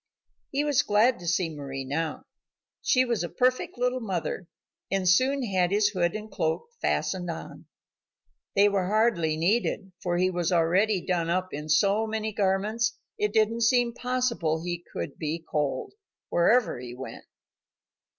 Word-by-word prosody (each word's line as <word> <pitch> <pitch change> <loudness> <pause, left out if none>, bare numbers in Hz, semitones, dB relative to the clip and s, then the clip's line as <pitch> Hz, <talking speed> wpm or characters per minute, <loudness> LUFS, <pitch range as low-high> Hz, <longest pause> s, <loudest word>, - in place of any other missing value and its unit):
He 280 +2 0
was 290 -3 +3
glad 225 +4 +3
to 175 - -8
see 175 +1 +2
Mari 135 -2 -5
now. 155 +4 -2 0.6
She 255 0 +3
was 235 -6 -1
a 175 - -3
perfect 255 0 0
little 250 +1 0
mother, 185 -5 -3 0.4
and 195 -1 0
soon 260 +9 +3
had 185 -5 +1
his 205 +1 +3
hood 175 -3 0
and 215 0 -6
cloak 160 - -1
fastened 180 -2 -1
on. 165 0 -7 0.9
They 200 +1 +6
were 195 -3 +1
hardly 205 -7 +2
needed, 195 +2 0
for 175 -1 0
he 185 +1 +2
was 175 -1 -1
already 180 +4 +3
done 170 -3 0
up 185 +2 0
in 150 +2 -5
so 200 +8 +3
many 220 0 -2
garments, 210 +3 0 0.2
it 210 0 +1
didn't 220 +2 +2
seem 240 +1 +3
possible 245 -11 -1
he 175 0 -4
could - - -5
be 160 +1 -3
cold, 145 -3 -2 0.4
wherever 220 - +3
he 120 -1 -8
went. 130 +1 -8
195 Hz, 155 wpm, -27 LUFS, 170-225 Hz, 0.9 s, They